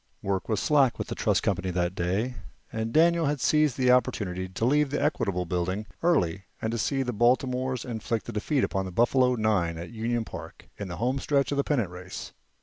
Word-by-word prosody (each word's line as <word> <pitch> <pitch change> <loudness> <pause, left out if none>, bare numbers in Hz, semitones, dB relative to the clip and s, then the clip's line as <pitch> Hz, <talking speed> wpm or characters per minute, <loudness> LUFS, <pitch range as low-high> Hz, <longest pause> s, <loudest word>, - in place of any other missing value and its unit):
Work 95 +1 -2
was 110 - +1
slack 140 -5 +3
with - - -4
the - - -2
trust - - +1
company 95 - 0
that 90 0 0
day, 95 +8 -1 0.4
and 110 0 -2
Daniel 165 +1 +4
had 145 0 0
seized 150 -1 +2
the 125 -1 +4
opportunity 95 -7 +1
to 95 +5 -2
leave 145 +3 +3
the 145 - -1
Equitable 100 - 0
Building 90 +4 -2 0.2
early 100 - +1
and 115 +1 -2
see 135 +3 0
the 125 -1 -3
Baltimores 125 +2 +1
inflict 115 -2 -3
a - - -4
defeat 130 +6 0
on 95 -1 0
the 95 - -6
Buffalo 125 +5 +3
nine 100 -7 +1
at 85 +5 -7
Union 115 0 -1
Park, - - -10
in 100 - -4
the 85 -1 -6
homestretch 135 +4 0
of 140 - -1
the 140 - +2
pennant 120 - 0
race. 90 +1 -8
115 Hz, 200 wpm, -27 LUFS, 95-135 Hz, 0.4 s, Daniel